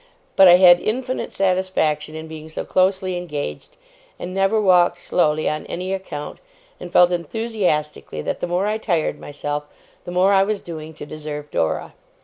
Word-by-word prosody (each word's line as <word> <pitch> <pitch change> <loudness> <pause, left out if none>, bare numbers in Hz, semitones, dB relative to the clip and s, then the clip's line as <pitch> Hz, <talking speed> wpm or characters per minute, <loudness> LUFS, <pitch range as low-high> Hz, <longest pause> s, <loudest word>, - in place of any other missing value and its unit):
But 195 - +8
I 175 - +9
had 180 -1 +7
infinite 255 +6 -3
satisfaction 185 -5 0
in 160 0 -7
being 160 0 -9
so 155 - -5
closely 185 0 +1
engaged, 150 - -6 0.4
and 180 - -6
never 195 +3 +2
walked 180 -3 +4
slowly 155 -3 +1
on 155 0 -2
any 185 +2 -4
account, 190 -6 -6 0.4
and 175 - -8
felt 180 0 +5
enthusiastically 175 - -2
that - - -3
the - - -2
more 180 +3 0
I 215 +1 -1
tired 170 -8 -1
myself, 145 0 -4 0.4
the - - -6
more 185 +3 +3
I 195 - +5
was 205 +1 0
doing 160 -2 -8
to 150 - -8
deserve 150 -1 -7
Dora. 80 -1 -1
175 Hz, 165 wpm, -21 LUFS, 155-190 Hz, 0.4 s, I